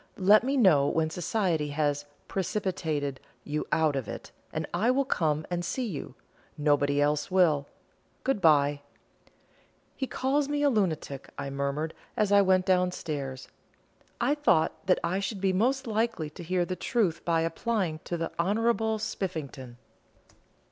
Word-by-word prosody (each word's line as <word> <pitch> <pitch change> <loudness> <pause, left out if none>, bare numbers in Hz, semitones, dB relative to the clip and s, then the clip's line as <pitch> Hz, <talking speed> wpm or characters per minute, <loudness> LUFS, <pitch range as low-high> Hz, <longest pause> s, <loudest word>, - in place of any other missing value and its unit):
Let 205 +3 +6
me 275 +2 0
know 160 - +5
when 160 0 0
society 175 -3 0
has 145 0 -1 0.2
'precipitated' 160 -8 -2 0.2
you 150 +1 -3
out 155 -3 +2
of 135 -3 -3
it, - - -7 0.2
and - - -3
I 205 +8 +2
will 270 +2 +2
come 155 - 0
and 175 0 -1
see 255 +8 -2
you. 145 - -6 0.4
Nobody 145 -1 +2
else 145 0 +1
will. 160 -7 +3 0.6
Good 265 -7 0
bye!" 145 -3 +4 1.1
"He 265 - -3
calls 275 +3 0
me 290 0 0
a 285 - +4
lunatic," 160 - -1
I 140 -1 -4
murmured, 140 +3 -2 0.2
as 210 -2 +2
I 200 0 +7
went 185 -1 +3
down 180 -1 +3
stairs; 140 -6 -5 0.7
"I 285 - +2
thought 200 - +1
that 185 - +4
I 180 +3 0
should 200 0 -3
be 190 0 +1
most 260 +8 +1
likely 220 -8 -1
to 165 - -10
hear 175 +1 0
the 185 - -3
truth 195 -6 0
by 165 -1 +2
applying 175 -1 -1
to 175 - -3
the 165 0 -3
Honourable 220 +4 +1
Spiffington." 140 - -5
175 Hz, 155 wpm, -28 LUFS, 150-210 Hz, 1.1 s, I